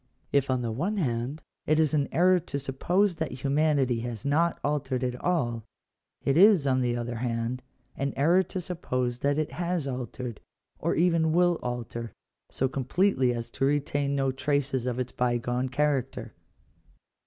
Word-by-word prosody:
If, 140 Hz, -1 st, +2 dB
on 130 Hz, -1 st, +1 dB
the 115 Hz, -, -2 dB
one 170 Hz, -, -1 dB
band, 135 Hz, -, -2 dB, 0.2 s
it 155 Hz, +1 st, +3 dB
is 155 Hz, -1 st, +2 dB
an 145 Hz, -2 st, +2 dB
error 180 Hz, +2 st, +4 dB
to 150 Hz, -3 st, -5 dB
suppose 170 Hz, +8 st, 0 dB
that 145 Hz, -6 st, -4 dB
humanity 140 Hz, -4 st, +2 dB
has 115 Hz, -2 st, -5 dB
not 165 Hz, +4 st, +2 dB
altered 135 Hz, -3 st, -1 dB
at 125 Hz, -1 st, -1 dB
all, 120 Hz, -11 st, 0 dB, 0.6 s
it 135 Hz, -, +2 dB
is, 190 Hz, -3 st, +6 dB
on 130 Hz, -1 st, +2 dB
the 120 Hz, -1 st, 0 dB
other 120 Hz, 0 st, -3 dB
hand, 120 Hz, +1 st, -2 dB, 0.3 s
an 140 Hz, +1 st, -1 dB
error 170 Hz, +7 st, +4 dB
to 190 Hz, +1 st, -5 dB
suppose 125 Hz, -9 st, -2 dB
that 140 Hz, +2 st, +1 dB
it 155 Hz, -1 st, -1 dB
has 170 Hz, 0 st, -2 dB
altered, 125 Hz, -2 st, -5 dB, 0.4 s
or -, -, 0 dB
even 165 Hz, -2 st, +3 dB
will 175 Hz, -1 st, +3 dB
alter, 120 Hz, -1 st, -5 dB, 0.4 s
so 130 Hz, -, 0 dB
completely 135 Hz, +1 st, +1 dB
as 115 Hz, -1 st, -4 dB
to 135 Hz, -, 0 dB
retain 140 Hz, 0 st, 0 dB
no 135 Hz, -1 st, +1 dB
traces 135 Hz, -1 st, -1 dB
of 125 Hz, -1 st, -1 dB
its 125 Hz, -1 st, -3 dB
bygone 125 Hz, +1 st, 0 dB
character. 140 Hz, -2 st, -1 dB
135 Hz, 165 wpm, -27 LUFS, 125-155 Hz, 0.6 s, is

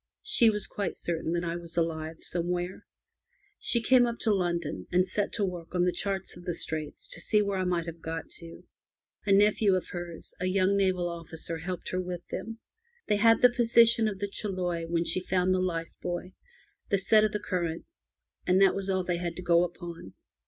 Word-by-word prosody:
She 425 Hz, -, +5 dB
was 210 Hz, -2 st, +1 dB
quite 200 Hz, -3 st, -3 dB
certain 165 Hz, -1 st, -2 dB
that 175 Hz, 0 st, -1 dB
I 170 Hz, 0 st, -2 dB
was 170 Hz, -1 st, -6 dB
alive 160 Hz, -1 st, -2 dB
somewhere. 175 Hz, +1 st, -3 dB, 0.7 s
She 235 Hz, -1 st, +2 dB
came 250 Hz, 0 st, +5 dB
up 235 Hz, 0 st, -3 dB
to 220 Hz, -, +3 dB
London, 170 Hz, -, -2 dB
and 180 Hz, +1 st, +3 dB
set 200 Hz, +2 st, -1 dB
to 205 Hz, -, +1 dB
work 175 Hz, -2 st, -6 dB
on 175 Hz, -, +3 dB
the 180 Hz, -, +3 dB
charts 195 Hz, 0 st, -3 dB
of 175 Hz, -, -12 dB
the 175 Hz, -2 st, -3 dB
Straits 155 Hz, -3 st, -4 dB
to -, -, -4 dB
see 210 Hz, -, +3 dB
where 200 Hz, -1 st, -1 dB
I 185 Hz, -, 0 dB
might 175 Hz, -2 st, 0 dB
have 165 Hz, -1 st, -8 dB
got 165 Hz, 0 st, -5 dB
to. 165 Hz, -1 st, -11 dB, 0.6 s
A -, -, +3 dB
nephew 205 Hz, 0 st, +4 dB
of 185 Hz, -, -3 dB
hers, 175 Hz, -2 st, -6 dB
a 185 Hz, -, -1 dB
young 190 Hz, +1 st, +2 dB
naval 185 Hz, -3 st, +1 dB
officer, 165 Hz, -1 st, -6 dB
helped 180 Hz, +1 st, -5 dB
her 185 Hz, -, -1 dB
with 180 Hz, -1 st, -6 dB
them. 225 Hz, +1 st, -5 dB, 0.5 s
They 210 Hz, -, +2 dB
had 225 Hz, +3 st, +4 dB
the 250 Hz, -, +8 dB
position 235 Hz, -1 st, +5 dB
of 205 Hz, -2 st, -3 dB
the 205 Hz, +1 st, -2 dB
Chiloe 180 Hz, -5 st, -3 dB
when 170 Hz, 0 st, 0 dB
she 170 Hz, -, +1 dB
found 185 Hz, 0 st, +1 dB
the 185 Hz, -, +1 dB
life 165 Hz, -3 st, -2 dB
buoy, 180 Hz, +1 st, -4 dB, 0.6 s
the 200 Hz, -, +3 dB
set 215 Hz, +3 st, +4 dB
of 215 Hz, -, +2 dB
the 210 Hz, -, -2 dB
current, 170 Hz, -4 st, -3 dB, 0.6 s
and 185 Hz, +1 st, +4 dB
that 195 Hz, -1 st, +6 dB
was 195 Hz, 0 st, -3 dB
all 190 Hz, -1 st, +1 dB
they 175 Hz, -1 st, -1 dB
had 170 Hz, -1 st, -3 dB
to 180 Hz, -, -7 dB
go 170 Hz, 0 st, +4 dB
upon. 170 Hz, -, -7 dB
180 Hz, 210 wpm, -28 LUFS, 170-200 Hz, 0.7 s, the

